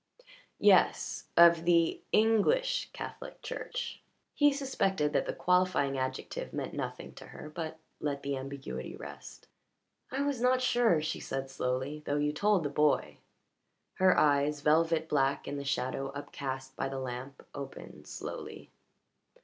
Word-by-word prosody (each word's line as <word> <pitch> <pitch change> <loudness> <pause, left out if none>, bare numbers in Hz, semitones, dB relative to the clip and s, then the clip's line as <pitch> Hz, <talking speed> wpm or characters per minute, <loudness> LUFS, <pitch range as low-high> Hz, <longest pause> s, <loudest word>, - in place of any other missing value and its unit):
"Yes. - - +3
Of 170 -1 +7
the 170 -1 +3
English 225 - +3
Catholic - - -8
Church." - - -5 0.3
He 290 0 +5
suspected 195 - 0
that - - +1
the - - 0
qualifying 180 -6 +2
adjective 130 0 -4
meant - - -4
nothing - - -5
to - - -12
her, 150 - -10
but 160 0 -5 0.2
let 140 -2 -2
the 140 0 -1
ambiguity 135 - -6
rest. - - -10 0.6
"I 270 +2 -1
was 285 -4 -1
not 250 +1 +4
sure," 240 -10 +3
she 155 - -2
said 135 0 -4
slowly, 130 +4 -2
"though 145 0 -1
you 150 0 +1
told 200 +2 +2
the - - 0
boy." 150 +1 +1 0.8
Her 185 -1 +5
eyes, 145 0 +3
velvet 160 +1 +3
black 135 -2 +1
in 145 - -3
the 140 - -4
shadow 135 0 -1
upcast 135 -2 -5
by 135 - -2
the 135 - -4
lamp, 130 +1 -6
opened 135 - -9
slowly. - - -7
150 Hz, 140 wpm, -31 LUFS, 135-185 Hz, 0.8 s, Of